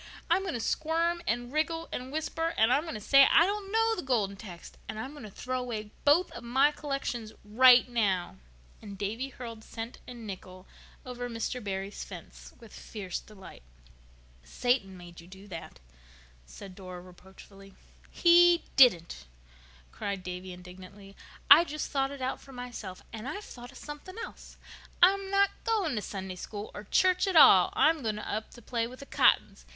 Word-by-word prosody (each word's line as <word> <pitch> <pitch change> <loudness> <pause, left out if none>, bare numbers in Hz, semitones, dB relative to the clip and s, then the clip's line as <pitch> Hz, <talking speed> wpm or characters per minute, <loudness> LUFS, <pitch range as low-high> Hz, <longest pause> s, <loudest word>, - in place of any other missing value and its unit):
I'm 360 +3 +4
going 385 -8 -3
to - - -3
squirm 330 +7 0
and 240 +2 -2
wriggle 325 +2 -1
and 255 +1 -5
whisper, 325 +2 -2
and 220 +3 +4
I'm 280 - +3
going 320 - -5
to - - -5
say 275 +6 +6
I 335 - +6
don't 400 0 -3
know 450 +1 +2
the 360 - -4
Golden 220 -7 0
Text. 185 -4 -11
And - - -5
I'm 260 +5 -5
going 290 -6 -10
to - - -9
throw 255 +5 -4
away 220 -4 -5
both 310 +5 +4
of - - -9
my 265 +5 +3
collections 275 -7 -4
right 250 +4 +6
now." 200 -7 -1 0.4
And 200 -2 -9
Davy 220 +7 -3
hurled 230 -4 -9
cent 225 +2 -8
and 240 -2 -9
nickel 185 -2 -9 0.4
over 245 -1 -5
Mr. 230 +1 -4
Barry's 195 0 -4
fence - - -11
with 230 -3 -15
fierce 195 -5 -6
delight. 200 -3 -14 0.8
"Satan 195 - -1
made 175 -1 -12
you 170 - -16
do 190 +2 -13
that," 165 - -9 0.7
said 190 - -11
Dora 185 -1 -9
reproachfully. 190 +2 -15 0.3
"He 345 0 +5
didn't," 170 - +4 0.6
cried 200 -2 -5
Davy 180 +1 -6
indignantly. 185 +2 -12 0.4
"I 305 +4 +11
just 305 -2 -5
thought 270 -1 0
it 280 -2 -7
out 260 - -3
for 270 - -14
myself. 245 -7 -8
And 225 +2 -7
I've 400 +8 -5
thought 245 -6 -11
of - - -14
something 295 +6 -9
else. - - -11 0.5
I'm 390 +1 +4
not 395 0 +3
going 420 - 0
to 210 - -2
Sunday 190 -2 -6
School 205 +2 -7
or 205 - -8
church 365 - +2
at 380 - -1
all. - - +8
I'm 320 -1 +3
going 215 -3 -2
up 215 +1 -4
to 240 - -14
play 230 -1 -2
with 255 +2 -12
the - - -9
Cottons. - - +2
240 Hz, 175 wpm, -29 LUFS, 195-295 Hz, 0.8 s, I